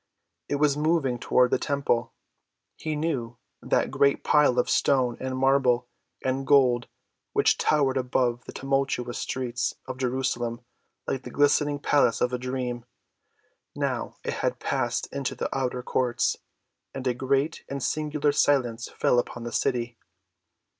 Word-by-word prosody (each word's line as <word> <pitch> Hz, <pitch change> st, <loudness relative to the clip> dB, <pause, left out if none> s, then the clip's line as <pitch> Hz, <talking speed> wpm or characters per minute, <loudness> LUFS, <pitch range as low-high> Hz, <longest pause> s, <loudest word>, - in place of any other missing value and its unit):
It -, -, 0 dB
was 145 Hz, -1 st, +3 dB
moving 150 Hz, -5 st, +1 dB
toward 125 Hz, +1 st, +3 dB
the -, -, +2 dB
temple, 140 Hz, -5 st, 0 dB, 0.6 s
he 155 Hz, -1 st, -3 dB
knew,—that 130 Hz, -7 st, -2 dB
great 140 Hz, 0 st, +2 dB
pile 150 Hz, -4 st, +4 dB
of 125 Hz, -, +2 dB
stone 130 Hz, -4 st, +2 dB
and 130 Hz, 0 st, -3 dB
marble 130 Hz, -2 st, +3 dB, 0.4 s
and 130 Hz, +1 st, -1 dB
gold 125 Hz, -4 st, +4 dB, 0.5 s
which -, -, +4 dB
towered 140 Hz, -3 st, +2 dB
above 125 Hz, -1 st, 0 dB
the -, -, -8 dB
tumultuous 135 Hz, -3 st, -1 dB
streets 120 Hz, -2 st, -2 dB
of 130 Hz, 0 st, -7 dB
Jerusalem 125 Hz, -2 st, -1 dB, 0.4 s
like 135 Hz, -, -2 dB
the -, -, -9 dB
glistening 145 Hz, 0 st, +2 dB
palace 140 Hz, -4 st, +2 dB
of 125 Hz, 0 st, 0 dB
a 125 Hz, -, -1 dB
dream. 125 Hz, -1 st, -3 dB, 0.9 s
Now -, -, -2 dB
it -, -, -2 dB
had -, -, 0 dB
passed -, -, -1 dB
into 140 Hz, -2 st, -2 dB
the -, -, -3 dB
outer 125 Hz, -2 st, -2 dB
courts, 125 Hz, -1 st, +1 dB, 0.6 s
and 135 Hz, -1 st, -5 dB
a 125 Hz, -, +2 dB
great 135 Hz, +4 st, 0 dB
and 140 Hz, -2 st, -4 dB
singular 150 Hz, -1 st, 0 dB
silence 125 Hz, -5 st, +1 dB
fell 125 Hz, -, +2 dB
upon 120 Hz, 0 st, -4 dB
the 120 Hz, -, -5 dB
city. 120 Hz, -1 st, -1 dB
130 Hz, 140 wpm, -26 LUFS, 125-140 Hz, 0.9 s, pile